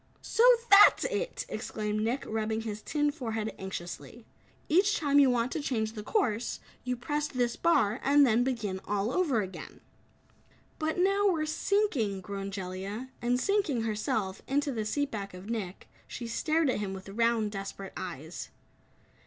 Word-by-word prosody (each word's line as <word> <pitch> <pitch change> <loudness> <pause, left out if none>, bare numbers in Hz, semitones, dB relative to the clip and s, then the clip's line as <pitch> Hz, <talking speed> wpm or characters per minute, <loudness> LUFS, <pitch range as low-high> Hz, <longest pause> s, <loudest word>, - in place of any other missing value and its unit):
"So 455 - +1 0.3
THAT'S 400 +1 +8
it!" - - -2
exclaimed 215 0 -3
Nick, 240 +5 -1
rubbing 220 0 -1
his 215 -2 -5
tin 295 +3 0
forehead 225 -7 -3
anxiously. 190 +4 -7 0.4
"Each 390 +6 +3
time 285 -2 +3
you 275 -2 +6
want 245 0 +1
to 320 - -2
change 220 -6 -1
the 215 - -6
course, 235 - 0 0.2
you 250 0 -2
press 295 +4 -2
this 245 -4 -1
bar 240 -10 +2
and 285 +1 +6
then 240 -1 +3
begin 220 -7 -2
all 205 +2 -1
over 295 -12 +2
again." 190 0 -9 1.0
"But 315 +1 -1
now 395 +3 +3
we're 320 -4 0
sinking," 310 - 0
groaned 195 +1 -5
Jellia. 195 +6 -5
And 245 +1 +1
sinking 340 - +1
herself, 210 -3 -2
into 285 +1 +1
the 220 -4 -3
seat 285 +6 -1
back 200 -3 -5
of 190 +5 -8
Nick, 200 -5 -5 0.2
she 240 - -6
stared 310 +5 +1
at - - -2
him 200 -2 -3
with 190 0 -10
round, 230 0 +1
desperate 195 -1 -6
eyes. 165 -2 -6
230 Hz, 160 wpm, -29 LUFS, 205-290 Hz, 1.0 s, THAT'S